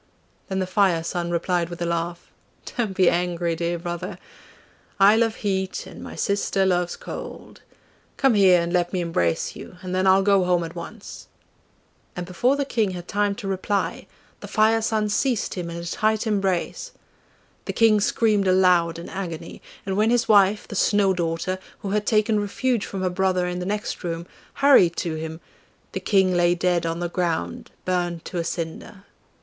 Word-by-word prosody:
Then 190 - -2
the 190 - 0
Fire 185 -3 +2
son 170 +1 -3
replied 175 0 0
with 175 - -8
a 175 - -1
laugh, 170 +1 -3 0.4
'Don't 220 -6 -1
be 185 -2 +5
angry, 175 -1 +1
dear 170 +1 -2
brother! 175 0 -5 0.8
I 200 +2 +7
love 225 -1 +2
heat 190 -2 -2
and - - -11
my - - -8
sister 200 -1 0
loves 175 -2 +1
cold - - -9 0.6
come 270 -3 +4
here 190 -4 +6
and 170 +1 -2
let 175 0 +1
me 185 - 0
embrace 125 - -1
you, 180 - -11
and 185 0 -5
then 185 +1 +1
I'll 190 +1 +5
go 200 -1 +4
home 180 -1 +2
at 165 0 -6
once.' 195 +5 -9 0.9
And 180 - -4
before 215 +10 +1
the 285 -1 -1
King 225 -6 0
had 175 - -9
time 205 0 0
to 205 -2 -7
reply, 195 +1 -2 0.3
the - - -9
Fire 220 +1 +3
son 215 -1 0
seized 230 +2 0
him 175 -2 -4
in 170 - -6
a 170 - -6
tight 215 +5 0
embrace. 200 - -1 0.7
The - - -3
King 220 -2 +4
screamed 210 -2 +2
aloud 180 -3 +3
in 170 - -8
agony, 170 -4 -6 0.2
and 190 -1 -2
when 215 +2 +3
his 240 0 +2
wife, 205 0 +4
the - - -7
Snow 200 -1 +3
daughter, 175 +2 -2 0.2
who 195 - -4
had 210 0 0
taken 215 -1 +2
refuge 230 +3 -1
from 190 -1 -4
her 185 - +1
brother 185 -1 +1
in 180 0 -3
the 180 - -4
next 210 0 -3
room, 170 -1 -3 0.4
hurried 180 -12 +6
to 170 -3 -2
him, 160 +1 -6 0.5
the - - -3
King 190 -3 +2
lay 175 0 +3
dead 175 -1 +1
on 165 +1 -3
the 175 - 0
ground 165 - -2 0.2
burnt 175 -2 -1
to 175 - -4
a - - -1
cinder. 170 +4 -5
185 Hz, 185 wpm, -23 LUFS, 175-205 Hz, 0.9 s, I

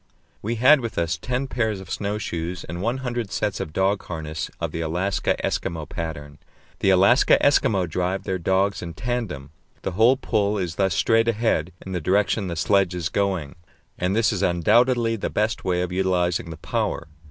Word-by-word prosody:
We 115 +3 -2
had 130 +6 +6
with 115 -4 -5
us 85 0 +1
ten 125 +9 -2
pairs 110 -6 -1
of 95 - -10
snow 105 +1 -2
shoes 85 -2 -4
and 85 +2 -6
one 125 +5 -2
hundred 120 -4 -2
sets 105 -3 -1
of 75 - -4
dog 95 +4 +1
harness 80 -2 -5
of - - -2
the 85 - -4
Alaska 90 +5 0
Eskimo 80 -3 -2
pattern. 75 -3 -6 0.4
The - - +2
Alaska 100 +7 +5
Eskimo 100 -10 +3
drive 90 +4 -2
their 95 -1 -2
dogs 95 +3 +1
in 85 -2 -7
tandem; 105 - -4 0.3
the - - -2
whole 115 +8 +4
pull 105 -5 0
is 90 -4 -2
thus 95 -1 +1
straight 115 0 +3
ahead 110 -7 +1
in 95 - -6
the 90 -2 -2
direction 100 +4 +1
the 85 - -3
sledge 95 +1 +2
is 85 -1 -2
going, 95 -7 -1 0.5
and 90 +2 0
this 115 0 +3
is 95 - -2
undoubtedly 115 +6 +3
the - - -3
best 110 +2 -1
way 90 -1 0
of 90 - -4
utilizing 90 -2 0
the 80 - -7
power. 80 +1 -2
95 Hz, 185 wpm, -23 LUFS, 85-110 Hz, 0.5 s, had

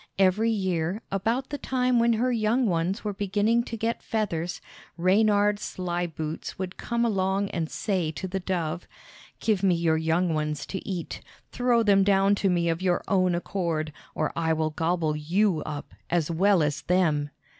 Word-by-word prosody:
Every 195 +4 +3
year, 190 -2 -1
about 225 +7 -1
the 290 - -3
time 250 -2 +1
when 235 0 +4
her 245 +3 +1
young 235 +2 +2
ones 180 +1 0
were 210 -1 -2
beginning 205 +4 +1
to 230 - -5
get 225 +2 -2
feathers, 180 -6 -2 0.4
Reynard 205 +3 +3
Sly 175 -3 -3
Boots 160 -1 -5
would 185 -1 -4
come 235 0 -1
along 195 -2 0
and 165 -3 -2
say 185 -7 -1
to 190 - -5
the 190 +1 -3
dove: 175 -3 -3 0.5
"Give 215 -4 +1
me 190 -3 +3
your 165 -1 +2
young 165 +2 +1
ones 150 -1 -2
to 190 - -4
eat; 180 -3 -4 0.3
throw 245 -2 +2
them 200 -2 +5
down 195 0 +4
to 195 - +3
me 175 -1 +1
of 165 +1 0
your 180 -2 +1
own 185 -3 +2
accord, 170 -4 -2 0.2
or - - -1
I 160 -1 +1
will 155 0 0
gobble 160 -1 0
you 170 +3 +1
up, 150 -2 -6 0.2
as 170 -2 +1
well 185 +1 +3
as 150 0 -1
them!" 155 -5 +1
185 Hz, 175 wpm, -26 LUFS, 165-210 Hz, 0.5 s, them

